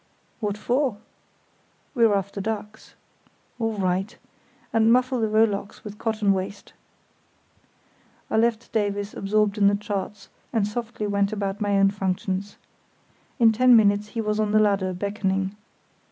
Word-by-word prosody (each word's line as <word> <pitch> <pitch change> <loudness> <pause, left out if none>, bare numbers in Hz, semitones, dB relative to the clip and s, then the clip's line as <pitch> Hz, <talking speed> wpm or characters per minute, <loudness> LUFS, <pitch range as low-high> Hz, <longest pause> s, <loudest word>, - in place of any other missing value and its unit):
"What 210 -2 -2
for?" 245 0 0 1.0
"We're 230 -6 +4
after 200 0 -3
ducks." 215 0 -6 0.6
"All 225 -1 0
right. 190 +2 -1 0.6
And 225 0 +4
muffle 255 0 +2
the 220 - +2
rowlocks 215 -2 0
with 210 0 -9
cotton 215 -3 +1
waste." 195 +1 -5 1.5
I - - -1
left 230 0 +1
Davies 205 -1 -1
absorbed 210 +1 0
in 200 - +5
the 200 - +4
charts, 205 -1 -5 0.2
and 220 -4 +1
softly 230 0 -4
went 200 0 +1
about 200 -1 -3
my 205 -1 +1
own 195 0 +4
functions. 190 0 -3 0.8
In 230 -4 +6
ten 250 +2 +5
minutes 205 -1 +4
he - - +1
was 210 0 -1
on 210 -1 0
the 215 - +5
ladder, 200 -3 +2
beckoning. 195 0 -2
210 Hz, 140 wpm, -24 LUFS, 200-220 Hz, 1.5 s, In